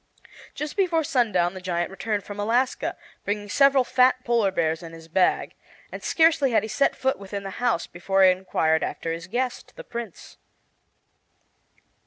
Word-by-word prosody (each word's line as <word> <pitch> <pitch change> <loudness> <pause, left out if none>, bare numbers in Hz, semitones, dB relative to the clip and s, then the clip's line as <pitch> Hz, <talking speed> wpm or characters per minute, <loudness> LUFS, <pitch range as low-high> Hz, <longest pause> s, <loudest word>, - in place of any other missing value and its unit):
Just 300 0 -5
before 350 -5 +1
sundown 210 -11 +1
the 185 - -8
giant 175 -1 -2
returned 205 +1 -3
from 205 +1 -8
Alaska, 240 +5 0 0.3
bringing 205 0 -3
several 275 +2 +4
fat 255 0 +3
polar 235 -4 +2
bears 165 -3 -1
in 165 -1 -10
his 165 0 -12
bag; 180 +3 +1 0.4
and - - -7
scarcely 320 -4 +3
had 230 - +2
he 220 - -5
set 275 +7 +1
foot 265 +1 -1
within 200 0 -6
the 195 - -6
house 240 -8 +1
before 195 +2 0
he 185 - +8
inquired 175 -3 0
after 165 - -3
his 165 +2 -7
guest, 245 +4 -3
the - - -9
Prince. 235 - -8
205 Hz, 165 wpm, -24 LUFS, 180-255 Hz, 0.4 s, he